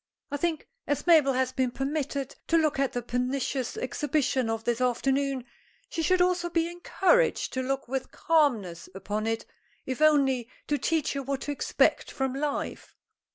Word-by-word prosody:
I 285 Hz, -, -1 dB
think, 320 Hz, +1 st, -1 dB, 0.2 s
as 290 Hz, -, -1 dB
Mabel 310 Hz, -6 st, +6 dB
has 255 Hz, 0 st, +1 dB
been 260 Hz, -1 st, 0 dB
permitted 275 Hz, +1 st, -3 dB
to 330 Hz, -, +4 dB
look 310 Hz, -3 st, +1 dB
at 275 Hz, -1 st, +1 dB
the 245 Hz, -, -2 dB
pernicious 250 Hz, +1 st, -2 dB
exhibition 260 Hz, -2 st, 0 dB
of 225 Hz, 0 st, -2 dB
this 240 Hz, +1 st, 0 dB
afternoon, 265 Hz, +1 st, +1 dB, 0.4 s
she 335 Hz, -, -2 dB
should 360 Hz, +3 st, +4 dB
also 360 Hz, -1 st, +1 dB
be 335 Hz, -1 st, +1 dB
encouraged 385 Hz, +7 st, +2 dB
to 260 Hz, -, -1 dB
look 270 Hz, 0 st, -2 dB
with 265 Hz, +1 st, -3 dB
calmness 240 Hz, -, +1 dB
upon 210 Hz, +3 st, -3 dB
it, 225 Hz, 0 st, -1 dB, 0.4 s
if 260 Hz, +2 st, -4 dB
only 270 Hz, -6 st, +4 dB, 0.2 s
to 290 Hz, -1 st, 0 dB
teach 320 Hz, -4 st, 0 dB
her 280 Hz, -, -2 dB
what 275 Hz, 0 st, -3 dB
to 290 Hz, -, -3 dB
expect 285 Hz, -, +1 dB
from 265 Hz, -1 st, -2 dB
life." 285 Hz, +1 st, -3 dB
275 Hz, 165 wpm, -28 LUFS, 255-310 Hz, 0.4 s, Mabel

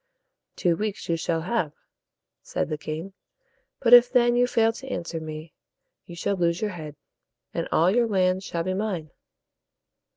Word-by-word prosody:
"Two 175 Hz, -2 st, +2 dB
weeks 210 Hz, +2 st, -4 dB
you 170 Hz, -, +2 dB
shall 165 Hz, 0 st, -1 dB
have," 175 Hz, -4 st, -1 dB, 0.7 s
said -, -, -3 dB
the 155 Hz, -, -2 dB
king; 160 Hz, +6 st, -6 dB, 0.7 s
"but 240 Hz, -1 st, +4 dB
if 245 Hz, 0 st, +9 dB
then 240 Hz, -1 st, +4 dB
you 245 Hz, 0 st, +4 dB
fail 225 Hz, -2 st, +2 dB
to 265 Hz, +4 st, -10 dB
answer 170 Hz, -9 st, -4 dB
me, 155 Hz, 0 st, -8 dB, 0.5 s
you 175 Hz, -, -9 dB
shall 200 Hz, +4 st, -1 dB
lose 170 Hz, -2 st, +1 dB
your 215 Hz, -1 st, -1 dB
head, 155 Hz, -5 st, -8 dB, 0.6 s
and -, -, -2 dB
all 170 Hz, +3 st, +4 dB
your 240 Hz, -1 st, +3 dB
lands 185 Hz, -2 st, +1 dB
shall 170 Hz, -3 st, -3 dB
be 185 Hz, +2 st, -1 dB
mine." 185 Hz, -7 st, -3 dB
185 Hz, 165 wpm, -25 LUFS, 165-225 Hz, 0.7 s, if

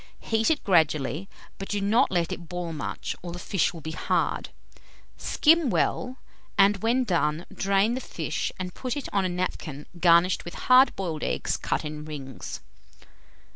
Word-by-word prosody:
Heat 225 Hz, 0 st, +1 dB
it 320 Hz, -, +1 dB
gradually, 160 Hz, -, +2 dB, 0.3 s
but 195 Hz, -, -6 dB
do 205 Hz, -, 0 dB
not 205 Hz, +4 st, +3 dB
let 175 Hz, -2 st, 0 dB
it 170 Hz, -2 st, -6 dB
boil 175 Hz, -2 st, -4 dB
much, 150 Hz, -, -4 dB
or 175 Hz, -, -6 dB
the 175 Hz, -, -6 dB
fish 180 Hz, 0 st, 0 dB
will 165 Hz, -, -10 dB
be 160 Hz, -, -5 dB
hard. 160 Hz, -, -1 dB, 0.7 s
Skim 325 Hz, -2 st, +3 dB
well, 255 Hz, +2 st, 0 dB, 0.4 s
and 200 Hz, +1 st, +5 dB
when 235 Hz, +6 st, +1 dB
done, 170 Hz, -5 st, 0 dB
drain 195 Hz, +3 st, +2 dB
the 260 Hz, -, -3 dB
fish 160 Hz, -9 st, -3 dB
and 180 Hz, 0 st, -5 dB
put 255 Hz, +1 st, -4 dB
it 285 Hz, -, -4 dB
on 195 Hz, -2 st, +2 dB
a -, -, 0 dB
napkin 175 Hz, -5 st, -4 dB
garnished 170 Hz, +1 st, +4 dB
with 175 Hz, -, -8 dB
hard 255 Hz, +1 st, +5 dB
boiled 165 Hz, -6 st, -3 dB
eggs -, -, -1 dB
cut -, -, -2 dB
in 150 Hz, 0 st, -5 dB
rings. 140 Hz, -4 st, -7 dB
180 Hz, 170 wpm, -26 LUFS, 160-215 Hz, 0.7 s, and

